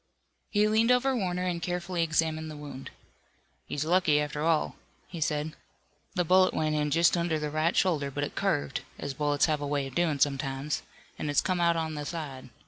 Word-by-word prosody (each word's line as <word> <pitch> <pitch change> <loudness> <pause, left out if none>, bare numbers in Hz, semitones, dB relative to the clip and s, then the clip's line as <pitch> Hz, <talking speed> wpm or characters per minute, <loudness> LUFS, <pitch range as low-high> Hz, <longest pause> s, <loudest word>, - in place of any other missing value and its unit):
He 210 0 +3
leaned 220 +2 +3
over 260 +2 +3
Warner 180 -5 -1
and 175 -2 -1
carefully 175 0 -2
examined 160 -1 0
the 155 - -8
wound. 140 -3 -8 0.8
"He's 145 +1 -2
lucky, 165 -3 +3
after 150 0 -2
all," 160 -1 +1 0.3
he 170 -3 -7
said, 150 0 -1 0.6
"the 180 -2 +1
bullet 185 +2 +4
went 155 -1 +1
in 150 -1 +1
just 170 +4 +4
under 170 -2 0
the 150 -1 -3
right 155 +3 +1
shoulder, 155 -7 +2
but 145 +1 -3
it 145 - -3
curved, 70 0 -1 0.2
as 140 - -4
bullets 145 +1 +2
have 155 -2 0
a 145 - -2
way 140 -1 0
of 135 - -8
doin' 160 -2 +1
sometimes, 135 +1 0 0.4
an' - - -2
has 145 -1 +3
come 185 -2 0
out 170 0 +4
on 160 -1 -2
the 150 -1 -4
side. 145 -5 -6
155 Hz, 200 wpm, -29 LUFS, 145-175 Hz, 0.8 s, bullet